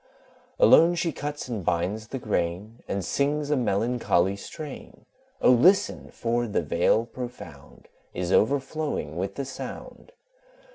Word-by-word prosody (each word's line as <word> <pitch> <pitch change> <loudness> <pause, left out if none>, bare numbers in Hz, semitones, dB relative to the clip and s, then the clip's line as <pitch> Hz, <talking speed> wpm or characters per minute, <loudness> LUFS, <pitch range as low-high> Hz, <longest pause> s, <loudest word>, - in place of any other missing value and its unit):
Alone 175 - +6
she 170 -1 0
cuts 145 0 -5
and 115 -6 -4
binds 90 +6 -1
the 135 - -5
grain, 105 0 -3
And 95 -2 -2
sings 145 +4 0
a - - +4
melancholy 110 -5 +1
strain; 150 +7 -9 0.4
O - - +7
listen! 175 +11 +3
for 120 +1 -1
the 100 -5 -1
Vale 85 +9 +2
profound 120 - -10 0.2
Is 90 0 -3
overflowing 135 - 0
with 95 +3 -3
the 140 - -3
sound. 135 - -9
120 Hz, 130 wpm, -26 LUFS, 95-145 Hz, 0.4 s, O